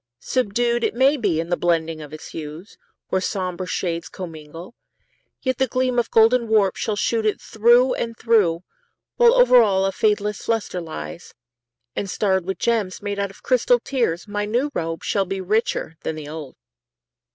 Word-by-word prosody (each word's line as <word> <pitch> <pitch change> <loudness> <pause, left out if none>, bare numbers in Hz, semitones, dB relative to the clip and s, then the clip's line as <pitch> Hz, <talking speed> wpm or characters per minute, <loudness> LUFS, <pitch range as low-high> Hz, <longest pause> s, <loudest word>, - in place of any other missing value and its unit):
Subdued, 240 - 0
It - - 0
may 265 +4 +4
be, 200 - 0
in 165 +1 -3
the 175 - +2
blending 165 -2 0
of 150 -1 -10
its 155 - -9
hues, 160 +4 -8 0.3
Where 190 - +1
somber 185 -1 -3
shades 170 -2 -3
commingle, 165 +2 -9 0.7
yet 260 -1 -1
the 265 - +3
gleam 255 0 0
Of 235 - -1
golden 230 +2 +4
warp 210 -4 +3
shall 215 - -2
shoot 225 +2 0
it 215 -1 0
through 240 +4 +4
and 230 -1 -4
through, 190 -8 +2 0.5
While 480 0 +6
over - - +7
all 195 -3 +2
a 195 - +1
fadeless 210 0 0
luster 220 -5 -1
lies, 165 +1 -8 0.6
And 200 - -3
starred 190 -2 0
with 190 - -2
gems 215 -5 -1
made 205 -1 -3
out 200 0 -1
of 195 - -17
crystalled 245 -1 +2
tears, 230 -10 -1
My 205 0 -2
new 245 +7 0
robe 165 -5 -3
shall 195 -2 0
be 195 +1 -4
richer 190 -4 -1
than 160 - -3
the 155 -2 -8
old. 150 -3 -8
205 Hz, 175 wpm, -22 LUFS, 175-235 Hz, 0.7 s, over